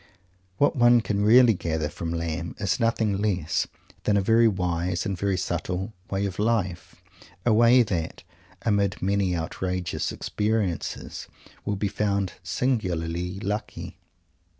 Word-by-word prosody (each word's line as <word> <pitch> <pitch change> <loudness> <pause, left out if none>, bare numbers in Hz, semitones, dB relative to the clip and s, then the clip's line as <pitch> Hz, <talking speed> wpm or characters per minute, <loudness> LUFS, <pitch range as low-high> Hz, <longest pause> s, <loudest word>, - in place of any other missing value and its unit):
What 145 - +3
one 120 -1 +6
can 100 -2 -1
really 120 +2 +7
gather 80 -4 -2
from 85 +1 -5
Lamb 85 0 -3
is 100 +1 0
nothing 115 -3 +1
less 95 -7 0 0.4
than 105 -1 +3
a - - +4
very 115 +3 +5
wise 90 -3 -1
and 100 - -1
very 95 +1 0
subtle 90 +3 -3 0.2
"way 100 +1 -1
of 95 -1 -4
life," 105 -5 -1 0.5
a 120 - +4
way 120 +3 +6
that, 85 -7 -3 0.4
amid 100 -4 +1
many 95 -1 +1
outrageous 90 +2 -2
experiences, 105 -6 -2 0.4
will 105 - 0
be 100 +1 -1
found 100 -2 -1
singularly 90 -7 -1
lucky. 105 +1 -4
100 Hz, 130 wpm, -26 LUFS, 90-110 Hz, 0.5 s, really